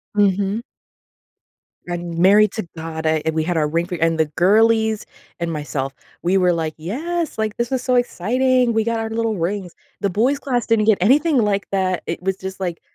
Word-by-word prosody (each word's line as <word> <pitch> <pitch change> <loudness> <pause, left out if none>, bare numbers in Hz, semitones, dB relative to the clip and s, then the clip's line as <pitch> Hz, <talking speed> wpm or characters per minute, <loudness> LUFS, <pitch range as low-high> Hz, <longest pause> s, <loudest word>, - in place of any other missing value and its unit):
Mhm. 200 +1 +2 1.3
I'm 175 -1 -3
married 205 +2 +6
to 220 -6 -4
God, 160 0 -5
a 155 -1 +1
and 160 - 0
we 160 0 0
had 175 0 -1
our 150 -1 +2
ring 165 +3 0
for 180 - -4
and 165 -1 +1
the 160 - +4
girlies 220 +3 +3 0.3
and 170 -1 -2
myself, 145 -3 -3 0.3
we 185 +3 +2
were 180 -1 +3
like, 160 -2 -2
"Yes, 310 - -3
like, 215 -1 -2
this 235 +1 -2
was 260 -2 0
so 255 0 +1
exciting. 245 +2 +2
We 220 0 +2
got 230 0 -1
our 225 - -3
little 225 -1 -1
rings." 180 +1 -3 0.3
The 200 - 0
boys 240 +9 +1
class 250 -4 -2
didn't 225 -2 +3
get 220 -3 +4
anything 285 - +4
like 205 -3 +1
that. 185 -2 0
It 165 - -4
was 190 +1 -1
just 190 0 -7
like 175 -3 -3
195 Hz, 200 wpm, -20 LUFS, 170-230 Hz, 1.3 s, married